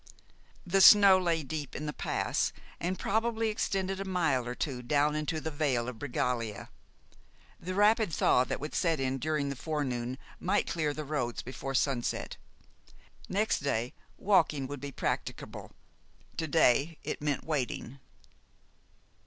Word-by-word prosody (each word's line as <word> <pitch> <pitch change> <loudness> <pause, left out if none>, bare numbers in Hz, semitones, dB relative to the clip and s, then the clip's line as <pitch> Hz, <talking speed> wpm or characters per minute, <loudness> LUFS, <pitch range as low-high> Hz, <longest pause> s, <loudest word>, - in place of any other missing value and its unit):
The 195 +2 +2
snow 200 -1 +9
lay 170 -3 0
deep 145 0 -5
in 150 - -4
the 150 - -3
pass, - - -1 0.3
and 180 +2 -2
probably 225 +1 0
extended 195 -2 -1
a - - -2
mile 160 -10 0
or 125 - -4
two 130 -3 -3
down 145 +4 +2
into 155 +1 -1
the 160 +1 -4
Vale 140 -6 0
of 125 -3 -6
Bregaglia. 120 -5 -2 0.9
The 185 +2 -5
rapid 210 -1 +4
thaw 125 -3 +3
that - - -3
would 150 +2 -6
set 165 -4 +1
in 135 0 -1
during 150 0 -1
the 140 - -3
forenoon 130 -4 -3 0.2
might 195 +3 +1
clear 155 -3 -1
the 155 - -5
roads 130 -5 -2
before 135 +2 -5
sunset. 130 -3 -1 0.9
Next 210 +3 +1
day, 125 -3 -1 0.2
walking 165 -8 +2
would 140 +1 -6
be 140 0 -5
practicable; - - -4 0.6
to 160 - -2
day 150 +1 +3
it - - -4
meant 145 -2 -1
wading. 140 -3 -3
150 Hz, 145 wpm, -30 LUFS, 130-180 Hz, 0.9 s, snow